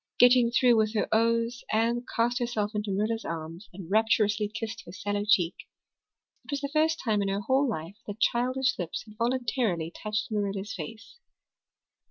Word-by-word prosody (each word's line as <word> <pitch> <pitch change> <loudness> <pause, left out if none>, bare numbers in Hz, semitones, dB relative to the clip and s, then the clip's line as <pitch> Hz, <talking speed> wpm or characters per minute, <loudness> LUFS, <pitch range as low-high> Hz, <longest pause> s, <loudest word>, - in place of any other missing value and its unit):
Getting 245 -1 +6
through 240 0 +4
with 215 0 +1
her 210 - +1
"ohs" 230 +2 +1
Anne 230 +2 +1
cast 240 +3 +2
herself 225 -4 -1
into 210 0 -2
Marilla's 215 +3 -1
arms 165 +4 -6
and 180 -2 -9
rapturously 215 -1 +3
kissed 225 +2 -5
her - - -8
sallow 205 +2 -2
cheek. 180 -5 +4 0.9
It - - -22
was 285 -1 -2
the 280 -1 -4
first 320 +1 +2
time 215 -4 +1
in 200 - 0
her 195 +1 -1
whole 265 +6 +2
life 170 -1 -5
that 205 +1 -6
childish 255 +2 +1
lips 175 -2 -4
had 215 -1 -14
voluntarily 230 -8 0
touched 215 +1 -3
Marilla's 205 0 -2
face. 215 - -8
220 Hz, 170 wpm, -28 LUFS, 205-240 Hz, 0.9 s, Getting